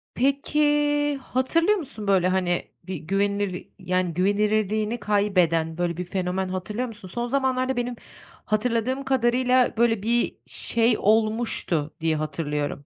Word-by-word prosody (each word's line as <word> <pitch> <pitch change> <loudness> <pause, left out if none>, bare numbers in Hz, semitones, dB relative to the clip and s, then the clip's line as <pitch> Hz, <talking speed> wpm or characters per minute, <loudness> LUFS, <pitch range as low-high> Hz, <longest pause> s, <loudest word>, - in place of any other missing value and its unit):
Peki, 280 +3 +1 0.6
hatırlıyor 330 +12 +1
musun 255 - -5
böyle 185 -2 +3
hani 180 -2 0
bir 190 0 -5
güvenilir 195 +3 -1
yani 185 -2 -1
güvenilirliğini 210 +3 +1
kaybeden 180 -6 +1
böyle 175 -1 -1
bir 180 - -3
fenomen 185 +1 -2
hatırlıyor 210 +7 -3
musun? 210 -4 -10
Son 240 +6 -3
zamanlarda 260 0 0
benim 245 0 -2 0.5
hatırladığım 235 +4 0
kadarıyla 255 -1 +2
böyle 225 -3 +2
bir 235 +1 +1
şey 230 0 +1
olmuştu 215 -8 +1
diye 160 -1 +1
hatırlıyorum. 150 -2 -3
210 Hz, 120 wpm, -24 LUFS, 180-240 Hz, 0.6 s, böyle